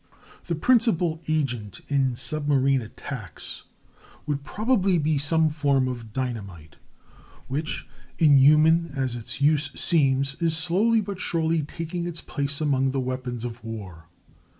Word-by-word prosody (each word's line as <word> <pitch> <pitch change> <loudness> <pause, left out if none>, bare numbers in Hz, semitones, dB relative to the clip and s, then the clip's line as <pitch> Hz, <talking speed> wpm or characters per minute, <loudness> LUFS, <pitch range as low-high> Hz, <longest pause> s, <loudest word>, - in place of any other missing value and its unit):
] - - -24
The 170 - -1
principal 175 -5 +2
agent 125 - -2
in 135 -3 +1
submarine 140 -1 +1
attacks 115 -2 -8 0.6
would 145 -2 -2
probably 200 - +1
be 155 -2 +1
some 160 +3 +2
form 140 -4 +1
of 120 -3 -6
dynamite, 100 -11 -5 0.7
which, 150 +4 -3 0.3
inhuman 155 +2 +5
as 130 -3 -1
its 120 +3 -5
use 145 0 +3
seems, 135 -5 +3
is 165 -1 +2
slowly 200 +7 +2
but 200 -2 -6
surely 165 -3 +1
taking 165 +3 -5
its 170 -1 -5
place 140 -1 -3
among 135 -3 +1
the 135 +1 -1
weapons 125 -2 -4
of 120 0 -7
war. 95 -8 -8
145 Hz, 130 wpm, -25 LUFS, 130-165 Hz, 0.7 s, inhuman